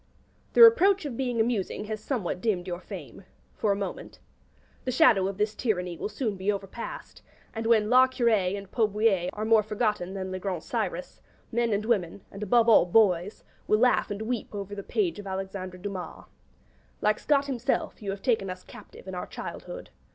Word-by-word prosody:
The 470 - +8
reproach 400 -5 +6
of 275 -5 -4
being 245 -2 -2
amusing 220 -3 -1
has 215 0 -5
somewhat 190 -9 -2
dimmed 195 -6 0
your 175 -2 -4
fame 180 - -10 0.3
for 210 - 0
a - - +2
moment. 200 -1 -6 0.7
The 255 - -2
shadow 230 - +5
of 195 -1 -4
this 210 +1 0
tyranny 180 -6 -2
will 185 - -4
soon 215 -1 -3
be 190 +2 0
overpast; 200 +3 -7 0.3
and 225 0 -3
when 220 -2 +4
'La 255 +3 +6
Curée 220 -7 +1
and 195 -1 -10
'Pot 220 -3 +2
Bouillé 205 -5 +2
are 215 +1 -4
more 220 -1 +5
forgotten 210 -3 -2
than 190 -1 -4
'Le 185 - -4
Grand 185 -4 -3
Cyrus,' - - -4 0.3
men 235 0 +1
and 205 +1 0
women 200 -5 -1
and, 200 - -9
above 230 +3 +3
all, 220 -6 +6
boys 185 -1 +2 0.2
will 215 - +4
laugh 250 +1 +3
and 205 +1 -4
weep 230 -2 -4
over 200 0 -5
the 200 - -5
page 345 - -1
of 200 - -8
Alexandre 190 -1 -5
Dumas. 190 -1 -7 0.7
Like 210 0 +1
Scott 285 -2 +2
himself, 265 -2 -2
you 200 -1 -3
take 225 +2 +1
us 185 -1 -6
captive - - -14
in 190 - -6
our 180 - -5
childhood. - - -8
210 Hz, 190 wpm, -27 LUFS, 190-235 Hz, 0.7 s, The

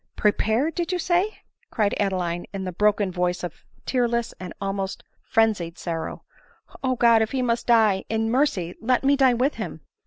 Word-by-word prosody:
" - - -55
Prepared! 220 +9 +2
did 345 +1 -2
you 365 - 0
say 360 +4 0 0.2
?" - - -40
cried 210 -3 +1
Adeline 180 -3 -1
in 195 -1 -4
the 185 - -3
bro 210 +4 +4
ken 200 -2 -2
voice 180 0 -1
of 175 - -7 0.2
tearless 235 -2 0
and 185 -2 -7
almost 195 -1 -3 0.2
frenzied 200 -7 +1
sorrow. 165 -2 -4 0.3
" - - -21
O 255 -1 +1
God! 235 -2 +5
if 220 +2 -1
he 260 -1 0
must 235 -1 -1
die, 220 -5 +4
in 225 0 0
mercy 245 - +1
let 250 +3 +1
me 280 +1 +4
die 265 -3 +4
with 260 +5 +1
him. - - -6
220 Hz, 195 wpm, -24 LUFS, 190-255 Hz, 0.3 s, God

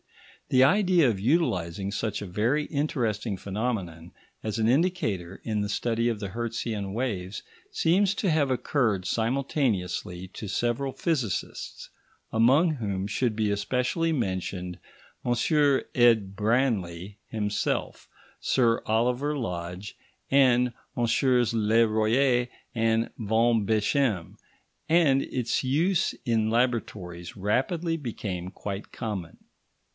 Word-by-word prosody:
The 130 0 +5
idea 180 -2 +4
of 105 -4 -2
utilising 100 - 0
such 105 +1 -2
a - - -4
very 115 +11 0
interesting 115 -8 -1
phenomenon 95 -5 -4 0.3
as 110 0 -2
an 110 - +2
indicator 115 - 0
in 110 -2 -1
the 105 - -2
study 115 +3 0
of 115 -3 -2
the 100 -2 -4
Hertzian 115 -2 -3
waves 105 -5 -3 0.3
seems 195 +4 +2
to 200 - 0
have 150 -4 +2
occurred 120 -6 0
simultaneously 110 - -1
to 105 - -7
several 120 +6 -1
physicists, 130 - -3 0.4
among 130 +10 +4
whom 100 -6 -3
should 115 +3 0
be 105 -1 +1
especially 125 - 0
mentioned 95 - -2 0.5
M. 120 - -1 0.6
Ed. 115 -6 +4
Branly 105 -5 0
himself, 105 -2 -2 0.3
Sir 115 -3 +2
Oliver 125 +7 +1
Lodge, 90 -3 -5 0.4
and 125 -3 +4 0.2
MM. 120 0 +2
Le 115 +1 +3
Royer 120 +3 +2 0.3
and 115 0 +1
Van 115 0 +2
Beschem, 110 -2 +1 0.5
and 155 -5 +4
its 125 -2 -1
use 160 +8 +1
in 110 -2 +1
laboratories 105 -8 -2
rapidly 155 - 0
became 100 - -5
quite 100 +1 -6
common. 100 -8 -5
115 Hz, 110 wpm, -27 LUFS, 100-130 Hz, 0.6 s, The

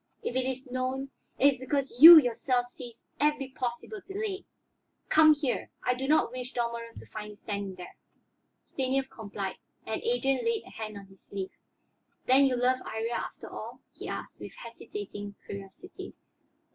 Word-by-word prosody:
If 245 - -3
it 260 -1 +1
is 260 +1 -4
known, 260 +2 -2 0.3
it - - +2
is 270 -3 +2
because 270 +1 -2
you 335 +2 +14
yourself 245 -2 +2
seized 245 -1 -11 0.2
every 295 -2 +1
possible 255 - -4
delay. 395 0 -4 0.6
Come 310 -1 +7
here; 280 -4 -2 0.2
I 250 - +3
do 260 +2 -4
not 305 -4 +3
wish 250 0 -6
Dalmorov 235 -1 -3
to - - -10
find 210 -1 -7
you 210 - -11
standing 200 -2 -5
there." 180 -1 -10 0.8
Stanief 265 0 0
complied, 200 -3 -5 0.3
and - - -3
Adrian 270 - +1
laid 460 -2 0
a - - -13
hand 215 -2 -6
on 200 - -10
his 195 -1 -20
sleeve. 195 -1 -6 0.7
"Then 265 +2 +6
you 260 -2 +2
love 250 +1 +2
Iría, 225 0 -4
after - - -5
all?" - - -8
he - - -8
asked, - - -6
with - - -8
hesitating 205 - -8
curiosity. 200 - -9
255 Hz, 165 wpm, -29 LUFS, 225-280 Hz, 0.8 s, you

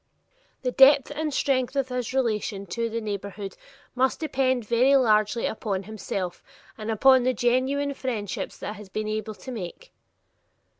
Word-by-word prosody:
The 250 - 0
depth 270 +2 +6
and 305 +1 -2
strength 265 -2 0
of 270 -2 0
his 250 -2 -3
relation 215 -6 -1
to 230 +5 -2
the 230 +1 -2
neighborhood 200 -2 -5 0.4
must 260 +1 +1
depend 260 -6 0
very 250 +5 +4
largely 220 -3 +3
upon 200 -3 -2
himself 190 -3 -5 0.3
and 215 0 -6
upon 260 +4 +5
the 255 +1 +1
genuine 260 +5 +1
friendships 225 -8 -4
he - - -5
has 210 -2 -7
been 215 +2 -3
able 215 0 -3
to 260 - -9
make. 230 - -7
235 Hz, 150 wpm, -26 LUFS, 210-265 Hz, 0.4 s, depth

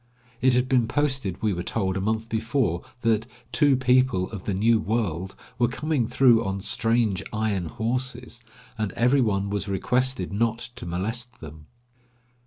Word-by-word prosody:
It 130 -1 +4
had 125 +1 +2
been 125 -3 +2
posted, 130 -8 -1
we 105 -2 +2
were 90 - -3
told, 95 0 -1
a 95 - -1
month 110 +2 -1
before, 110 - 0 0.2
that 110 -1 +1 0.2
"two 145 -1 +4
people 125 -7 +2
of 100 -5 -7
the 100 - -1
new 110 +3 +3
world" 100 -5 -2 0.2
were 120 - +4
coming 135 0 -1
through 120 -3 +4
on 95 0 -2
"strange 115 -1 +1
iron 110 -4 -1
horses," 120 +3 -3 0.4
and 110 -3 -1
every 125 +4 +3
one 100 -3 0
was 105 0 -2
requested 125 +1 0
not 115 +2 +1 0.2
to 120 - -7
molest 115 +8 -4
them. 75 0 -11
115 Hz, 160 wpm, -25 LUFS, 100-125 Hz, 0.4 s, It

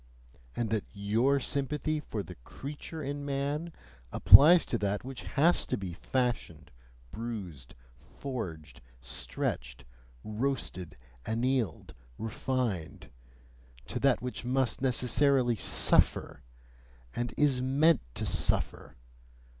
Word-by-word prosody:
And 115 -3 -2
that 110 -3 0
YOUR 115 +8 +2
sympathy 150 +3 -1
for 110 -8 -5
the - - -10
"creature 150 - -7
in 145 +1 -4
man" 145 +4 -2 0.4
applies 165 +5 +8
to 120 - -2
that 100 0 -1
which 130 0 -7 0.2
has 165 +5 +4
to - - -1
be 95 -3 -5
fashioned, 120 - -2 0.4
bruised, 100 - -7 0.2
forged, 80 - -7 0.2
stretched, - - -5 0.4
roasted, 110 - -3 0.3
annealed, 115 - -1 0.2
refined 115 -6 -3 0.7
to - - -4
that 135 -3 +2
which 125 -1 -5
must 125 0 0
necessarily 130 0 +2
SUFFER, 95 - +2 0.7
and 120 0 -2
IS 140 -4 +3
MEANT 140 +3 +3
to - - -2
suffer? - - -1
125 Hz, 105 wpm, -30 LUFS, 100-140 Hz, 0.7 s, applies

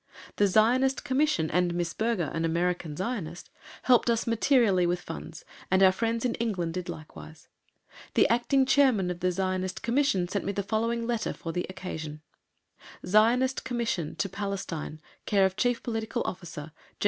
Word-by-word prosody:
The 205 - +4
Zionist 245 +7 +3
Commission 260 - +1
and 175 0 +1
Miss 175 -1 -2
Berger, 220 -9 -1
an 165 - -1
American 170 -2 -1
Zionist, 185 -5 -4 0.3
helped 245 -1 +4
us 230 -1 +1
materially 230 -6 +3
with 175 0 0
funds, - - -9 0.2
and 190 +1 +4
our 190 - +7
friends 230 +4 -1
in 240 - +1
England 175 -6 -2
did 180 0 -5
likewise. 80 - -10 0.7
The - - +5
Acting 245 +4 +2
Chairman 255 -9 +3
of 175 - -6
the 185 0 +1
Zionist 185 0 -2
Commission 235 -8 +1
sent 200 +3 -2
me 200 - -2
the 200 - -2
following 230 +3 -1
letter 235 -2 -1
for 165 - -6
the 180 +2 -3
occasion: 160 -5 -7 0.8
ZIONIST 240 +6 +3
COMMISSION 230 -10 -2
TO - - -1
PALESTINE, 195 -6 -5 0.3
c/o 195 -2 +4
Chief 235 +5 -1
Political 225 +1 -2
Officer, 165 -4 -6
G.H. - - -29
195 Hz, 160 wpm, -28 LUFS, 175-235 Hz, 0.8 s, our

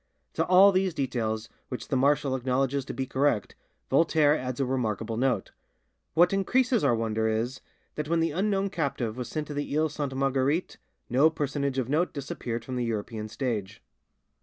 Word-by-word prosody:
To - - +1
all 190 +2 +7
these 185 -2 +1
details, 115 -5 -2 0.2
which 125 - -6
the - - 0
marshal 140 0 +2
acknowledges 130 +1 0
to - - -5
be 135 - -2
correct, 130 -5 0 0.4
Voltaire 150 0 +4
adds 130 -2 -4
a 135 - +2
remarkable 115 -4 -2
note: 120 -4 0 0.6
"What 175 +3 +5
increases 245 +4 +2
our 130 -4 +4
wonder 110 -1 0
is, 115 +4 -1 0.3
that 150 -1 -4
when 170 0 +2
the 165 -1 +1
unknown 195 +3 0
captive 135 - -2
was 125 -2 -5
sent 155 -1 -3
to 150 - -7
the 145 0 -2
Iles 155 -1 +1
Sainte 145 -3 -3
Marguerite 135 +5 0 0.3
no 135 +6 +4
personage 145 -3 -2
of 130 -3 0
note 155 +6 +1
disappeared 120 -4 -5
from 130 -1 -4
the 120 - 0
European 110 -1 -3
stage." 110 -4 -4
135 Hz, 175 wpm, -27 LUFS, 120-155 Hz, 0.6 s, all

